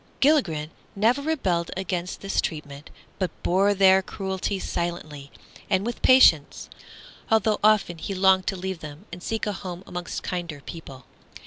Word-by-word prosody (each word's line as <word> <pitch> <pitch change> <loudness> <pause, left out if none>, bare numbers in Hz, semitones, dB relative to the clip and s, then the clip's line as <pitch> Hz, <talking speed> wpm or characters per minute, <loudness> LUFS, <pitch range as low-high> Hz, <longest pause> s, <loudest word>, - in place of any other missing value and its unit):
Gilligren 170 - +2 0.2
never 230 +7 +2
rebelled 190 - -1
against 180 -1 -3
this 195 0 0
treatment, 145 -2 -6 0.3
but 185 -2 0
bore 195 +3 +3
their 190 0 +6
cruelty 190 0 -3
silently 165 -6 -4 0.4
and 190 +1 +1
with 240 0 -4
patience, 170 - +5 0.6
although 220 -1 +2
often 210 -6 +3
he 195 - -4
longed 190 0 +4
to 195 - 0
leave 190 -1 -4
them 150 -1 -10
and 175 - -8
seek 225 +4 -3
a 210 - -1
home 185 -2 -7
amongst 175 0 -6
kinder 170 -5 -4
people. 135 -5 -10
185 Hz, 145 wpm, -25 LUFS, 170-200 Hz, 0.6 s, their